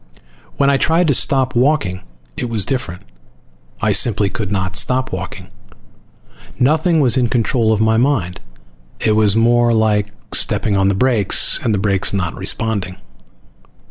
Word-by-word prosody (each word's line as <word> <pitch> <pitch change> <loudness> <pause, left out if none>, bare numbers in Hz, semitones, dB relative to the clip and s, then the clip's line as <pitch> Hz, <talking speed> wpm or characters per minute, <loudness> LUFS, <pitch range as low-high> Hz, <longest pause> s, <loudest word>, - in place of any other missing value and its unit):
When 140 0 +2
I 140 - +2
tried 165 +4 +1
to - - +3
stop 130 0 +2
walking 120 -8 0 0.3
it 120 - -5
was 110 -4 0
different. 100 -9 -5 0.8
I 110 - +2
simply 105 -1 +2
could 105 -4 -5
not 95 -2 -3
stop 130 +4 0
walking. 90 0 -7 1.1
Nothing 155 +4 +1
was 130 -2 +3
in 125 -2 0
control 115 -1 0
of 110 - 0
my 110 0 +1
mind. 115 -9 -1 0.6
It 110 - 0
was 105 -1 +2
more 120 +1 +2
like 105 -2 0 0.2
stepping 105 - +1
on 95 0 +1
the 100 - 0
brakes 110 -3 +2
and 115 - -1
the 105 - 0
brakes 100 -1 +1
not 95 -4 -2
responding. 100 -5 -3
110 Hz, 150 wpm, -16 LUFS, 100-125 Hz, 1.1 s, to